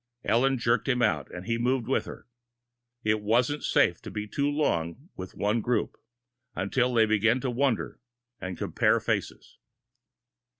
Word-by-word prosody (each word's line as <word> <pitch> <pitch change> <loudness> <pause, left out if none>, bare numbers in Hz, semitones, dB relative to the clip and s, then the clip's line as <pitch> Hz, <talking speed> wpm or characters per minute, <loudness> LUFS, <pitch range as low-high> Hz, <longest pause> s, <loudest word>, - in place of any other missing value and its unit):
Ellen 130 +5 +2
jerked 115 +2 +1
him 125 -2 +2
out, 75 -5 +1
and 90 +1 -8
he 115 +2 -1
moved 125 -1 0
with 135 - 0
her. - - -10 0.8
It 110 0 +1
wasn't 120 +7 +1
safe - - +2
to - - -8
be 105 0 -4
too 140 +6 0
long 135 - -1
with 95 0 -8
one 105 +3 0
group, 120 +2 -1 0.6
until 125 +6 0
they 110 -1 +5
began 110 +3 +2
to 130 - -1
wonder 130 -1 -1 0.4
and 95 -2 -5
compare - - +2
faces! - - -4
115 Hz, 155 wpm, -27 LUFS, 105-130 Hz, 0.8 s, they